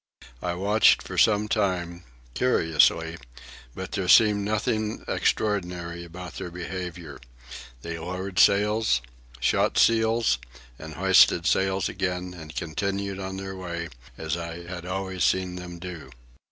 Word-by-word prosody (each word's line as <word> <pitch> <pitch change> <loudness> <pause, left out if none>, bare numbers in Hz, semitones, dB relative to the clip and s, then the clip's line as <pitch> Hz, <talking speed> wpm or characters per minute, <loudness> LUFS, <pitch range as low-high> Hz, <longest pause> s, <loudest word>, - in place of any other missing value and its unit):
I 85 -1 -2
watched 105 +4 +4
for - - -7
some 105 0 +3
time, 90 -5 -1 0.3
curiously, 80 - +2 0.6
but 95 0 -6
there 95 -3 -2
seemed 105 0 +6
nothing 110 +1 -1
extraordinary 90 -5 -1
about 90 +1 -9
their - - -5
behaviour. 85 -4 -7 0.6
They 85 0 -5
lowered 90 +2 -4
sails, 105 - +3 0.4
shot - - +1
seals, 110 - +3 0.4
and 80 0 -9
hoisted 90 -1 +5
sails 95 0 +1
again, 90 -1 -3
and 80 -2 -10
continued 100 +4 -3
on 95 0 -5
their 95 0 -6
way 85 -2 -5 0.3
as 80 0 -2
I 85 0 -6
had 90 0 -7
always 95 0 -3
seen 90 -1 +1
them 90 -1 -8
do. 85 -2 -8
90 Hz, 125 wpm, -26 LUFS, 85-100 Hz, 0.6 s, seemed